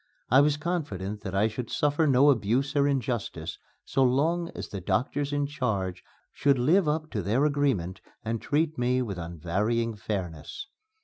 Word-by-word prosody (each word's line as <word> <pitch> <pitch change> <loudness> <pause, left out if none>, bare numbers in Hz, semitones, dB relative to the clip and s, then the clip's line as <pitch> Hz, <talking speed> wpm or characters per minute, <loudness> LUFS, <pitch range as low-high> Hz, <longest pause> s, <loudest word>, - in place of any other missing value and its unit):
I 130 +2 +7
was 145 0 +3
confident 105 - -3
that 95 -2 -5
I 100 +3 +3
should 115 +2 -5
suffer 150 +2 +1
no 140 +1 +6
abuse 130 +4 0
or 140 0 +4
injustice 130 -5 -2 0.3
so 135 - 0
long 160 +7 +2
as - - -6
the 100 - -5
doctors 130 +10 0
in 145 0 0
charge 100 -10 -2 0.3
should 140 -1 +2
live 160 +8 +3
up 155 +1 -1
to 105 - -1
their 115 +10 +2
agreement 130 - 0 0.2
and 115 0 -2
treat 155 0 0
me 125 +1 +2
with 100 -6 -5
unvarying 100 +8 -1
fairness. 95 - -5
125 Hz, 165 wpm, -27 LUFS, 100-145 Hz, 0.3 s, I